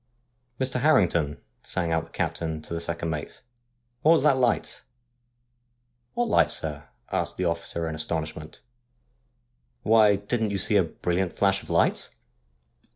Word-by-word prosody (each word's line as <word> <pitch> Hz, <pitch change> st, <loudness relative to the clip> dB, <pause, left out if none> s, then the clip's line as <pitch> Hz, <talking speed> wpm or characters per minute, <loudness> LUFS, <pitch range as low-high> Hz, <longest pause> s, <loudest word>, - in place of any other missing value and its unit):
' 120 Hz, 0 st, -31 dB
Mr. 130 Hz, -1 st, 0 dB
Harrington,' 85 Hz, -, +2 dB, 0.2 s
sang 85 Hz, -1 st, -2 dB
out 80 Hz, 0 st, 0 dB
the -, -, -20 dB
captain 80 Hz, -2 st, -3 dB
to -, -, -7 dB
the 85 Hz, -, -3 dB
second 85 Hz, 0 st, -3 dB
mate, 75 Hz, -1 st, -6 dB, 0.3 s
' 120 Hz, 0 st, -47 dB
what 160 Hz, -, +6 dB
was 160 Hz, -, +3 dB
that 145 Hz, -3 st, +5 dB
light? 125 Hz, -2 st, 0 dB, 0.5 s
' 120 Hz, 0 st, -47 dB
' 120 Hz, 0 st, -47 dB
What 240 Hz, 0 st, 0 dB
light, -, -, +3 dB
sir? 75 Hz, -1 st, -1 dB
' -, -, -30 dB
asked -, -, -2 dB
the 90 Hz, -, -1 dB
officer 85 Hz, 0 st, -2 dB
in 80 Hz, -, -4 dB
astonishment. 80 Hz, 0 st, -4 dB, 0.6 s
' 120 Hz, -, -46 dB
Why, 110 Hz, -2 st, +5 dB
didn't 110 Hz, +2 st, -2 dB
you 100 Hz, -, -2 dB
see 105 Hz, -, +3 dB
a 95 Hz, -, +4 dB
brilliant 90 Hz, +2 st, -2 dB
flash 100 Hz, -1 st, +1 dB
of -, -, -15 dB
light -, -, +1 dB
100 Hz, 170 wpm, -26 LUFS, 80-120 Hz, 0.6 s, what